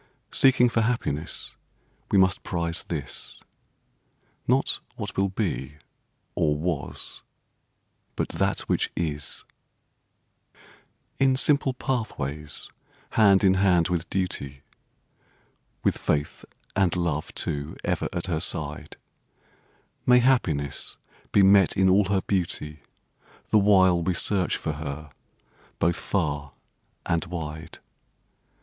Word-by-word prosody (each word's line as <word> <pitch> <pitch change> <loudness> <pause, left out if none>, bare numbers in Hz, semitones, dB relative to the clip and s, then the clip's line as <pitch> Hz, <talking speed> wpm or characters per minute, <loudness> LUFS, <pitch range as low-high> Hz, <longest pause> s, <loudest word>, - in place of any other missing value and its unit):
Seeking 125 -2 +5
for 115 -1 +1
happiness 110 - -2 0.5
we - - +3
must 95 -1 +4
prize 85 -2 -2
this— 75 -5 -5 1.1
Not - - +2 0.2
what - - -6
will 95 0 +1
be, 90 -8 -3 0.6
or 75 -4 +1
was, 80 -2 -3 0.9
but - - -2
that - - 0
which - - 0
is. 75 -4 -3 1.8
In 135 -1 +4
simple 135 -1 +3
pathways 75 - -3 0.4
hand 100 -3 +5
in 95 -1 +6
hand 95 -3 +3
with 85 -3 -2
duty 70 -8 -3 1.2
(With - - +1
faith 75 0 -1 0.3
and 95 -3 +2
love, 85 -4 -1
too, 70 +2 -3
ever - - -1
at 85 -1 -2
her 85 -4 -1
side), 75 -3 -3 1.1
May 125 0 +7
happiness 90 - +1 0.3
be 100 - +5
met 95 -1 +5
in 95 0 +4
all 95 +2 +5
her 95 0 +1
beauty 85 -6 -2 0.7
The 110 - +5
while 95 -3 +5
we 90 +2 0
search 95 0 +1
for - - -3
her 75 0 -6 0.7
both 85 0 +2
far 75 -7 -2 0.5
and 85 0 +1
wide. 80 -2 -6
90 Hz, 110 wpm, -26 LUFS, 75-100 Hz, 1.8 s, May